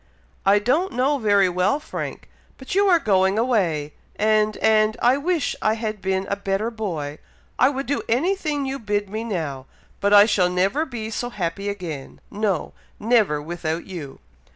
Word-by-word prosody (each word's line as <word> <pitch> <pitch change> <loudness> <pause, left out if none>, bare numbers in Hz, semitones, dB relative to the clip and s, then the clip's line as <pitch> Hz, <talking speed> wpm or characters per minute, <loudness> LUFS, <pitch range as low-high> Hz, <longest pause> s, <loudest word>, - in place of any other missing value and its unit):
"I 200 +1 +6
don't 265 - +1
know 275 +4 +1
very 205 -4 +4
well, 180 +9 +1
Frank! - - -6 0.3
but 265 - -7
you 400 +2 +3
are 360 -3 +6
going 190 - +2
away, 180 - 0 0.2
and 215 0 +2
and 220 0 +3
I 250 +3 +4
wish 330 0 -1
I 215 0 +2
had 215 -2 -4
been 190 0 -1
a 200 - -1
better 200 +3 -2
boy! 160 -10 -4 0.4
I 255 - +6
would 275 0 -3
do 285 - -1
any 315 +12 +2
thing 300 -6 -2
you 270 +1 -3
bid 205 -3 -2
me 220 +1 -3
now! 155 - -4 0.3
but 200 - +1
I 205 0 +9
shall 185 -4 +2
never 195 - +1
be 225 -3 -5
so 245 +2 -3
happy 195 -1 -3
again 170 -9 -6
no! 205 -2 -1 0.3
never, 215 -9 +2
without 160 +1 -4
you!" 160 -8 -8
210 Hz, 175 wpm, -23 LUFS, 185-245 Hz, 0.4 s, I